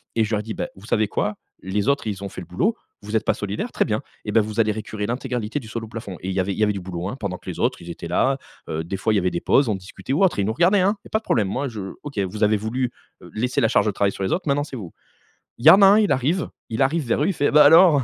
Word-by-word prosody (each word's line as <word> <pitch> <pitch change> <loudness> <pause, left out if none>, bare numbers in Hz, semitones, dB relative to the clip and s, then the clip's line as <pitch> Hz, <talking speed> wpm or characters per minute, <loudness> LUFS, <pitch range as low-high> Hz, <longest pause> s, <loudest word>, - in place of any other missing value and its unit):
et 115 - +3
je 110 +1 -1
leur 105 - -2
dis: 110 0 -5
«Bah - - -3
vous 95 - -14
savez 110 -2 +2
quoi? 105 +1 -1 0.3
Les 100 +4 -1
autres 140 +1 +1
ils 100 -2 -4
ont 100 - -4
fait 90 - -8
le 90 - -10
boulot, 200 - 0 0.3
vous 105 +2 -5
êtes 110 - +1
pas - - +3
solidaire, 100 0 -4
très - - +1
bien - - -1 0.2
et 105 - -2
beh, 110 - +5
vous 110 +1 -4
allez 110 -1 +3
récurer 105 -1 -5
l'intégralité 125 0 -3
du 120 - -12
sol 115 0 -4
au - - -12
plafond», 110 -5 -7
et 95 - -4
il - - -1
y - - +1
avait 95 +2 -2
il - - -7
y - - +3
avait 105 0 +2
du 100 - -4
boulot 90 -1 -5
hein, 120 - -5
pendant 100 -4 -3
que - - -10
les - - -6
autres - - 0
ils 85 - -10
étaient 85 - -7
là, 135 +10 +2 0.3
heu, 80 +1 -2
des 95 +4 -4
fois 110 +3 +1
il - - +3
y - - +4
avait 90 -1 0
des 85 - -3
pauses, 140 - +3
on 105 - +1
discutait 95 +7 -6
ou 160 - +2
autre 190 - +3
et - - +2
ils - - 0
nous 110 - 0
regardaient 180 - +4
hein. 200 +3 +2
Il - - -10
y - - -20
a - - -43
pas 220 - +2
de - - -27
problème, 110 - +1
moi 135 +7 -2
je: 100 -5 -6
«OK, 140 -7 -5
vous 100 +2 -2
avez 105 0 +4
voulu, 120 +4 -2 0.3
heu, - - -13
laisser 125 +4 0
la 115 - +4
charge 115 - +3
de - - +2
travail 100 0 +1
sur 95 - -5
les 95 - -1
autres, 185 - -1
maintenant 145 0 +2
c'est 140 -3 -8
vous». 95 -7 -8 0.6
Il 120 - -9
y - - +11
en 195 - +7
a - - +9
un 200 +2 +7
il 210 - +2
arrive, 145 +7 +1 0.2
il 110 - -2
arrive 150 +3 0
vers 115 - +1
eux, - - +2
il 195 - +1
fait: 145 -3 +1
«Bah, 150 0 +7
alors! 160 -2 +7
110 Hz, 345 wpm, -22 LUFS, 100-140 Hz, 0.6 s, y